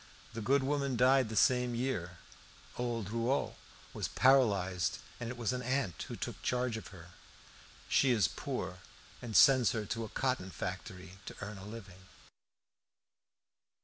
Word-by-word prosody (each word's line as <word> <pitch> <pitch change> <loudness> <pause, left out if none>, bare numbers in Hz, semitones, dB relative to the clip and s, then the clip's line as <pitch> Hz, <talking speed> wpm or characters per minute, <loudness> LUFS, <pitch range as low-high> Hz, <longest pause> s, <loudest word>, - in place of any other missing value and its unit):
The 115 - -5
good 135 +6 +2
woman 140 -2 0
died 130 0 +4
the 110 - -5
same 125 +1 +3
year; 90 -9 -2 0.6
old 115 -4 -3
Rouault 115 +4 0 0.4
was - - -2
paralysed, 100 -9 +3 0.2
and 120 -1 -4
it 125 - -6
was 120 +1 -1
an 125 - -3
aunt 125 -8 -1
who - - -6
took - - -6
charge 125 -2 0
of 110 - -7
her. 85 -3 -12 0.8
She 135 - +3
is 110 -8 +4
poor, - - -5 0.4
and 115 -3 -6
sends 130 -4 +6
her 110 -2 -2
to 115 +2 -3
a 110 - -6
cotton 130 -8 -1
factory 90 +2 -7
to - - -7
earn 100 -1 -6
a 95 - -10
living. 95 -4 -10
115 Hz, 150 wpm, -33 LUFS, 95-125 Hz, 0.8 s, sends